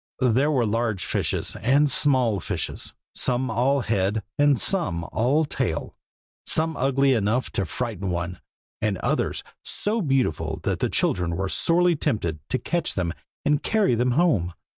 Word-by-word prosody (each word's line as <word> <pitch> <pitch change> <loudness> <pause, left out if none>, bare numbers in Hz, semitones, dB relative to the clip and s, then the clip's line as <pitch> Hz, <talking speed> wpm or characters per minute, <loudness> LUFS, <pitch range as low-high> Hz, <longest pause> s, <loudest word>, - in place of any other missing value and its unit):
There 135 +6 +3
were 130 -6 +2
large 110 -3 -1
fishes - - -1
and 140 +5 +3
small 130 -7 +2
fishes, - - -3 0.2
some 125 -1 0
all 130 +5 +2
head 105 -2 0
and 145 -3 +3
some 165 - 0
all 135 +8 +2
tail, - - -3 0.5
some 160 0 +1
ugly 135 +1 +2
enough 115 +2 0
to 95 - -2
frighten 105 -1 -3
one, 90 0 -3 0.4
and 105 -3 0
others - - -1 0.2
so 220 +2 0
beautiful 130 - 0
that - - -1
the - - 0
children 90 -2 0
were 95 0 -2
sorely 175 - +3
tempted 85 - -1
to 130 - +1
catch 170 +4 -1
them 85 -3 -1 0.3
and 150 0 +2
carry 215 - +2
them 125 +2 +1
home. 115 - +2
125 Hz, 150 wpm, -24 LUFS, 100-145 Hz, 0.5 s, There